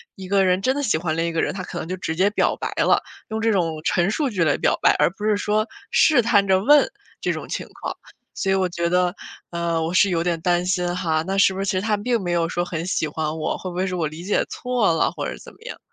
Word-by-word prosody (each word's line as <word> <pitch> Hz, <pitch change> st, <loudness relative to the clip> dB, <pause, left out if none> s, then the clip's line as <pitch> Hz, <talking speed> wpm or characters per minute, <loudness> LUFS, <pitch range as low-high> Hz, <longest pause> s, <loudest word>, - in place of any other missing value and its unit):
一 190 Hz, -1 st, -9 dB
个 200 Hz, 0 st, +3 dB
人 185 Hz, +1 st, +2 dB
真 255 Hz, +5 st, +2 dB
的 285 Hz, -, -1 dB
喜 215 Hz, -, +2 dB
欢 160 Hz, -1 st, -2 dB
另 165 Hz, -, +1 dB
一 -, -, -2 dB
个 165 Hz, -, +1 dB
人， -, -, -1 dB
他 190 Hz, -1 st, -5 dB
可 -, -, -7 dB
能 -, -, -5 dB
就 185 Hz, -, -3 dB
直 160 Hz, -3 st, -3 dB
接 190 Hz, +4 st, +3 dB
表 -, -, +1 dB
白 -, -, -3 dB
了， -, -, +3 dB, 0.3 s
用 220 Hz, 0 st, -3 dB
这 225 Hz, 0 st, +2 dB
种 165 Hz, -6 st, 0 dB
陈 175 Hz, +3 st, +1 dB
述 285 Hz, +4 st, 0 dB
句 190 Hz, -7 st, 0 dB
来 145 Hz, -, +3 dB
表 -, -, +1 dB
白， -, -, +5 dB
而 -, -, +4 dB
不 205 Hz, +3 st, -7 dB
是 215 Hz, -1 st, +3 dB
说 215 Hz, +2 st, 0 dB, 0.2 s
试 295 Hz, -6 st, +5 dB
探 205 Hz, -3 st, +3 dB
着 190 Hz, -1 st, +4 dB
问， 290 Hz, +4 st, +5 dB, 0.3 s
这 -, -, 0 dB
种 -, -, -6 dB
情 -, -, -4 dB
况。 -, -, -4 dB, 0.4 s
所 195 Hz, -, -2 dB
以 195 Hz, -, +3 dB
我 190 Hz, -1 st, +1 dB
觉 170 Hz, 0 st, -2 dB
得， 180 Hz, 0 st, +2 dB, 0.4 s
呃， 170 Hz, -1 st, -1 dB
我 165 Hz, +2 st, -2 dB
是 195 Hz, +2 st, +4 dB
有 170 Hz, -2 st, 0 dB
点 170 Hz, -1 st, -1 dB
担 175 Hz, +1 st, +1 dB
心 180 Hz, -1 st, 0 dB
哈， 160 Hz, -3 st, 0 dB
那 195 Hz, +1 st, -1 dB
是 195 Hz, -1 st, +5 dB
不 190 Hz, -, -6 dB
是 195 Hz, -, -1 dB
其 -, -, 0 dB
实 185 Hz, -, 0 dB
他 210 Hz, 0 st, 0 dB
并 235 Hz, +2 st, 0 dB
没 175 Hz, -, -2 dB
有 170 Hz, -1 st, +1 dB
说 175 Hz, +1 st, -1 dB
很 170 Hz, -1 st, -4 dB
喜 185 Hz, -, 0 dB
欢 155 Hz, +1 st, -3 dB
我， 155 Hz, -, -2 dB
会 185 Hz, -, -6 dB
不 175 Hz, -, -8 dB
会 185 Hz, +1 st, 0 dB
是 185 Hz, -1 st, -3 dB
我 165 Hz, -3 st, 0 dB
理 155 Hz, +3 st, -9 dB
解 200 Hz, +3 st, +1 dB
错 245 Hz, -8 st, 0 dB
了 165 Hz, -, +1 dB
或 -, -, -5 dB
者 -, -, -7 dB
怎 -, -, -12 dB
么 -, -, -22 dB
样。 -, -, -7 dB
180 Hz, 315 characters per minute, -22 LUFS, 170-200 Hz, 0.4 s, 白